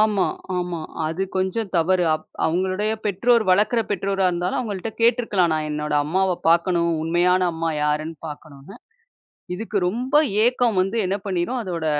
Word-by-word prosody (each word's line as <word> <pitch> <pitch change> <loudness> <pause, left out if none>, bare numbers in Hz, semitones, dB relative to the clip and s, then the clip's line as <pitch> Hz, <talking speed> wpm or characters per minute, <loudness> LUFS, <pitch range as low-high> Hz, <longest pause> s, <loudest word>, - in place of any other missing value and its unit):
ஆமா, 210 -3 +3 0.3
ஆமா. 175 -2 -3 0.3
அது 165 +4 -2
கொஞ்சம் 190 +2 -1
தவறு. 180 +2 +2
அப் 155 - -6 0.2
அவங்களுடைய 185 +5 0
பெற்றோர், 230 +4 +3
வளர்க்கிற 210 +5 +3
பெற்றோர் 195 0 -1
இருந்தாலும், 180 0 -1
அவங்கள்ட்ட 220 -3 -4
கேட்டுருக்கலாம், 230 -7 +3
நான் 155 -1 -2
என்னோட 150 0 -2
அம்மாவ 190 +4 +1 0.2
பாக்கணும். 170 0 +3
உண்மையான 175 +3 +2
அம்மா 165 0 -2 0.2
யாருன்னு 155 +2 -1
பாக்கணும்ன்னு. 150 +2 -11 0.8
இதுக்கு 215 +1 -3
ரொம்ப 250 +8 -2 0.3
ஏக்கம் 240 -4 +2
வந்து 195 +5 -1
என்ன 190 +2 0
பண்ணிடும்? 195 +6 -1
அதோட 170 -4 -4
185 Hz, 140 wpm, -22 LUFS, 170-210 Hz, 0.8 s, ஆமா